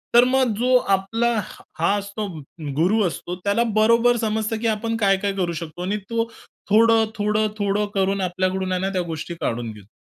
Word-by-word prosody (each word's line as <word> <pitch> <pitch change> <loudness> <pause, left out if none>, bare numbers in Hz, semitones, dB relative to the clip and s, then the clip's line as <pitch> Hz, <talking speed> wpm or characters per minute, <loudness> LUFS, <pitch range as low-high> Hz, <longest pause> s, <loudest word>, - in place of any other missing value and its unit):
तर 240 - +9
मग 255 -3 +2
जो 255 +2 +3 0.2
आपला 225 +5 -1 0.5
हा 170 +5 +3
असतो, 200 +1 -4 0.5
गुरु 190 +8 +3
असतो, 175 +1 -5
त्याला 205 +3 +2
बरोबर 230 +2 +4
समजतं, 220 0 -1
की 230 - 0
आपण 225 +1 -1
काय 195 -3 +3
काय 200 0 -1
करू 180 -3 -1
शकतो. 165 +1 -7
आणि 205 +3 -1
तो 230 0 -1 0.4
थोडं, 225 +1 +5
थोडं, 210 +1 +1
थोडं 205 +1 0
करून 195 0 +1
आपल्याकडून 185 +1 -1
आहे 180 0 0
ना, 195 - 0
त्या 185 - +1
गोष्टी 165 0 -5
काढून 115 -1 -2
घेतो. 105 -2 -14
205 Hz, 180 wpm, -22 LUFS, 185-225 Hz, 0.5 s, तर